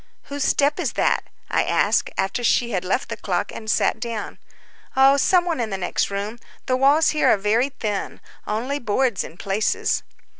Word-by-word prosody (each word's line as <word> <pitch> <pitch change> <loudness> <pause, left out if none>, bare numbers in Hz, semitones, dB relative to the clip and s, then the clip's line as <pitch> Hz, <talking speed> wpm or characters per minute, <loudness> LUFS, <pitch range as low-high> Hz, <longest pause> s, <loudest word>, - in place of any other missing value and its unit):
"Whose 285 0 -4
step 285 +2 +2
is - - -1
that?" - - +1 0.3
I - - +2
asked, - - +1
after 195 +5 -1
she 240 0 +2
had 185 -3 -1
left 195 +8 -1
the - - -4
clock, - - -2
and 220 - -7
sat 220 - +2
down. 230 -3 -5 0.6
"Oh, 270 +1 +6
some 350 +5 +3
one 335 -6 -1
in 230 -2 -1
the 195 - -3
next 180 - -1
room. 200 +4 -4 0.3
The 255 - +1
walls 280 +5 +4
here 300 -4 +2
are - - +5
very 220 +7 +1
thin—only 230 +2 -4
boards 240 -1 0
in 165 - -11
places." 200 +3 0
235 Hz, 180 wpm, -22 LUFS, 205-275 Hz, 0.6 s, Oh